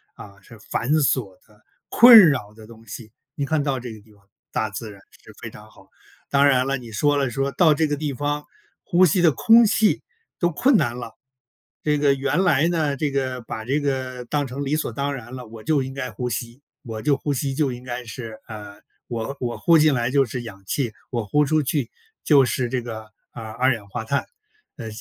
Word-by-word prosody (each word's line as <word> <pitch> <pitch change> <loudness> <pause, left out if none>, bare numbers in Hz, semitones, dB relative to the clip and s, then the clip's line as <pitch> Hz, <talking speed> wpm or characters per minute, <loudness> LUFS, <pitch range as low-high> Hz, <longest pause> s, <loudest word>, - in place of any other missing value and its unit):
啊， 100 -1 -13
是 115 +2 -15
繁 115 +4 -3
琐 130 -9 +1
的、 105 -1 -25 0.2
困 230 -5 +9
扰 105 -7 -3
的 110 0 -14
东 115 -1 -15
西。 110 0 -10 0.2
你 140 - -2
看 155 0 0
到 135 -3 -1
这 120 -2 -7
个 110 - -13
地 110 +1 -23
方， 100 - -23 0.3
大 110 - -1
自 105 +2 -7
然 100 - -14 0.2
是 - - -14
非 - - -6
常 - - -15
好， - - -20 0.4
当 140 0 +4
然 130 -2 +3
了， 135 - 0
你 120 -3 -11
说 145 +7 +1
了 140 -3 0
说， 135 +3 -1
到 160 -4 +4
这 155 +1 +1
个 145 - -1
地 145 -1 -3
方 145 +3 -2 0.4
呼 185 0 +4
吸 175 +2 +2
的 165 -3 +5
空 225 - +5
气 215 0 +2 0.4
都 175 - +1
困 255 - +3
难 125 - +1
了。 115 -2 -8 0.7
这 150 -1 +1
个 145 -1 +3
原 140 +7 0
来 160 -2 +3
呢 155 -5 0
这 150 +2 -1
个 130 -2 -2
把 110 -1 -7
这 135 +6 0
个 130 -3 -3
当 145 +3 -1
成 135 +2 -5
理 140 +3 0
所 155 - -2
当 140 +4 -3
然 120 -1 -10
了， 125 -2 -8
我 110 0 -12
就 155 -3 +1
应 130 0 -5
该 130 -3 -5
呼 125 +3 -4
吸， 120 +3 -5 0.2
我 110 -2 -6
就 145 +2 +2
呼 145 +1 -2
吸 135 0 -2
就 145 -3 +1
应 125 0 -8
该 125 -1 -6
是， 115 -2 -8
呃， 105 -2 -9 0.3
我 120 +3 -5
我 120 -2 -3
呼 170 -2 +4
进 150 -1 +4
来 120 0 -1
就 140 -1 +3
是 125 +1 -5
氧 100 -4 -10
气， 130 -6 -1 0.2
我 120 -3 -2
呼 150 +9 +2
出 155 +1 +1
去 135 -3 -1 0.4
就 140 -3 +6
是 125 0 -1
这 125 0 -2
个， 110 -2 -8 0.2
啊， 115 - -9
二 125 +4 +2
氧 105 -3 -8
化 115 +3 -5
碳。 140 +5 -1 0.5
呃， 115 -5 -7
130 Hz, 240 characters per minute, -22 LUFS, 115-145 Hz, 0.7 s, 困